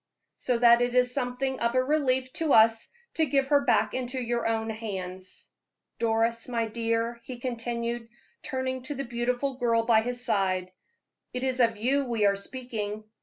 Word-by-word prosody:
So 250 -2 0
that 235 0 +6
it 245 0 0
is 250 0 +3
something 260 0 -2
of 235 +1 0
a 255 - +4
relief 260 -3 +1
to 320 -3 +1
us 225 0 +5 0.2
to 320 -1 +1
give 275 -1 +1
her 285 -1 +4
back 250 - +2
into 255 0 -3
your 240 -1 -1
own 225 0 -1
hands. 190 -4 -7 0.5
Doris, 230 0 +1
my 235 -2 -1
dear," 230 +1 -2
he 255 - -7
continued, 235 -1 -3 0.3
turning 260 -2 -3
to 290 - -4
the 275 - -3
beautiful 250 +2 -2
girl 230 -2 +2
by 225 -1 +4
his 245 +1 -3
side, 185 -2 0 0.6
"it 250 - -2
is 260 -1 0
of 230 -2 +3
you 270 +6 +1
we 230 -4 0
are 200 0 +4
speaking. 215 -1 -5
240 Hz, 170 wpm, -27 LUFS, 225-255 Hz, 0.6 s, that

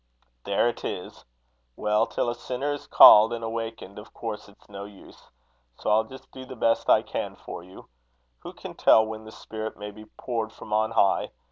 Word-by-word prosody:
"There 100 +4 +2
it 120 - -4
is! - - -6 0.5
Well, 105 0 +1
till - - -2
a - - -3
sinner 130 +4 -3
is 145 - -8
called 110 +2 +9
and 115 -1 -5
awakened, 115 -3 -5
of 105 - -14
course 110 -3 -6
it's 100 - -23
no 100 -1 -8
use. 100 -1 -15 0.5
So - - -2
I'll 110 +1 +3
just 130 +3 -14
do 130 - -10
the 130 0 -10
best 115 -1 +1
I - - +5
can - - -5
for - - -9
you. 95 +2 -14 0.5
Who - - -9
can - - -9
tell 110 - +5
when 110 0 -7
the 110 - -10
Spirit 110 0 -7
may 105 0 -7
be 110 +1 -13
poured 115 -3 -3
from 105 - -9
on 110 +1 +2
high? 110 -4 +2
110 Hz, 200 wpm, -26 LUFS, 105-115 Hz, 0.5 s, called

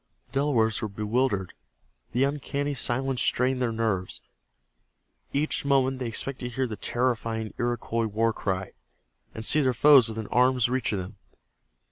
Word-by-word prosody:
The 135 - -1
Delawares 115 -7 +1
were 110 - -1
bewildered. 105 -1 -1 0.6
The 125 +3 +2
uncanny 145 0 -1
silence 130 0 0
strained 130 +1 +1
their 120 -2 +1
nerves. 110 -5 -2 1.1
Each 150 +2 0
moment 135 -2 +2
they 125 - -3
expected 125 +2 -3
to 120 - -11
hear 130 0 +1
the 110 -3 -5
terrifying 115 -2 -2
Iroquois 120 -1 -1
war 115 +2 +1
cry, 95 -3 -3 0.6
and 110 - -4
see 150 - +4
their 130 -3 +1
foes 135 -3 +6
within 110 0 -5
arm's 125 -1 +3
reach 125 -2 -1
of 105 - -1
them. 90 -1 -7
120 Hz, 150 wpm, -26 LUFS, 110-130 Hz, 1.1 s, foes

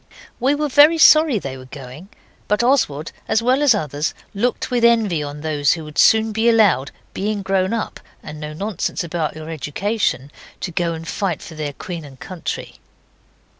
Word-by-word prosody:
We 265 +4 +2
were 300 +1 -1
very 295 +4 +6
sorry 310 -5 +6
they 135 -8 -5
were 130 - -11
going, 135 +7 -10 0.4
but 210 +3 +1
Oswald, 165 - +1 0.2
as 225 - +1
well 255 +4 +2
as 280 -6 +5
others, 150 -4 -2 0.2
looked 235 +6 -1
with 245 -1 +1
envy 220 -9 +3
on 145 0 -6
those 150 -3 +1
who 165 - -6
would 150 -1 -6
soon 220 0 +5
be 220 +2 +2
allowed 200 - +3 0.2
being 205 0 -2
grown 190 -1 0
up, 230 -1 -3 0.2
and 150 0 -8
no 150 0 -6
nonsense 195 +2 -3
about 165 -3 -3
your 155 +1 -7
education 155 - -2 0.3
to 180 - -3
go 170 0 -1
and 165 0 -8
fight 185 -4 -2
for 165 - -10
their 150 -2 -4
Queen 170 +2 -7
and 135 -3 -13
country. 180 -4 -6
180 Hz, 180 wpm, -20 LUFS, 150-225 Hz, 0.4 s, very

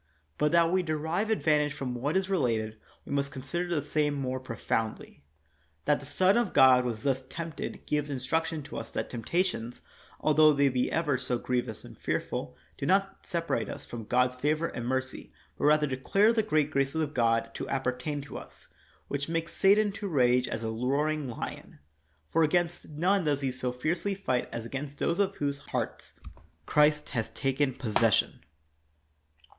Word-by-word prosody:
But 150 0 +3
that 170 -1 +5
we 185 0 +3
derive 160 +5 -1
advantage 150 -8 +2
from 135 -3 -4
what 140 +8 0
is 190 0 0
related, 115 - 0 0.3
we - - -9
must 140 0 0
con 130 - -7
sider 175 +6 -2
the 170 -4 -1
same 150 -1 0
more 130 -2 -2
profoundly. 115 - -3 0.6
That 145 - +3
the 140 - -10
Son 185 +8 +3
of 240 -4 0
God 130 -1 +7
was 115 -3 -3
thus 135 -1 +1
tempted 165 0 -6
gives 150 -1 -1
instruction 155 +4 -1
to 145 - -8
us 115 - -8
that - - -4
temptations, 120 -1 -2 0.4
altho 155 0 +5
they 140 -1 +3
be 125 -1 0
ever 150 -6 +1
so 125 -1 -1
griev 125 0 -1
ous - - -8
and - - -12
fearful, - - -3 0.2
do - - -2
not 195 +1 +1
separate 170 -3 -1
us - - -7
from 115 -2 -7
God's 125 +2 +2
favor 155 +5 0
and 120 0 -5
mercy, 130 -5 -2 0.2
but - - -2
rather 150 0 +5
declare 195 - +2
the 225 - +3
great 155 -8 +1
graces 140 +2 0
of 155 -2 -1
God 115 -1 +1
to - - -5
appertain 135 +2 -2
to 140 - -7
us, - - -12 0.4
which 140 +2 -3
makes 165 0 -2
Satan 205 +2 +4
to 205 0 -5
rage 125 -6 +3
as 115 - -4
a 110 - -2
roaring 140 +5 0
lion; 115 - -7 0.5
for 165 - +3
against 175 +2 +1
none 180 +6 +1
does 145 -2 +1
he 135 -2 0
so 125 -1 -2
fiercely 170 +10 -1
fight 130 -11 -1
as 115 -1 -5
against 140 +4 -5
those 170 - 0
of 200 -1 +1
whose 140 -1 -2
hearts - - -4 0.5
Christ 150 0 +3
has 115 -4 -2
taken 135 -1 0
possession. 110 -5 +2
145 Hz, 180 wpm, -29 LUFS, 125-165 Hz, 0.6 s, God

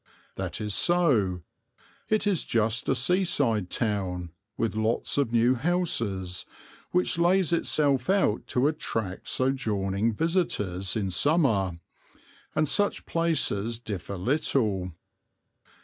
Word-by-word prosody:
That - - -4
is 105 -2 -2
so. 110 - +2 0.7
It 215 0 +2
is 200 -5 +1
just 115 0 0
a 135 - +3
seaside 130 - +1
town, 95 -6 -2 0.3
with 115 - -1
lots 110 +5 0
of 135 -5 0
new 120 +2 +4
houses, 115 - -1 0.5
which 180 -1 +1
lays 175 0 +3
itself 145 -3 +1
out 190 - +1
to 125 +3 +1
attract 110 -10 -3
sojourning 110 -5 0
visitors 105 - -1
in 100 -4 -1
summer, 105 - +2 0.8
and 155 0 +2
such 205 +7 +1
places 120 -10 0
differ 100 -4 -6
little. 105 - 0
115 Hz, 110 wpm, -27 LUFS, 100-160 Hz, 0.8 s, new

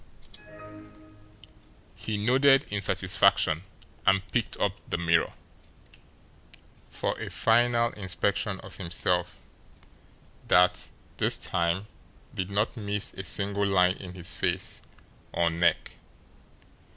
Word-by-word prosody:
He 110 -1 -4
nodded 135 +5 +4
in 105 -1 -1
satisfaction; 80 -3 +2 0.4
and 95 0 +2
picked 115 +3 -1
up 100 - +2 0.2
the - - -1
mirror 85 -1 +1 1.6
for - - -2
a - - -5
final 120 +1 +3
inspection 95 0 -2
of - - -11
himself, 90 -1 -1 1.1
that, 90 +1 +4 0.3
this - - +2
time, 85 +4 -1 0.5
did 95 -1 -3
not 105 +4 0
miss 105 -2 -2
a 95 - -6
single 100 +1 +1
line 90 -1 +3
in 90 -1 -9
his 90 -2 -4
face - - 0 0.5
or 85 -1 +2
neck. 85 +1 +1
95 Hz, 105 wpm, -27 LUFS, 90-105 Hz, 1.6 s, nodded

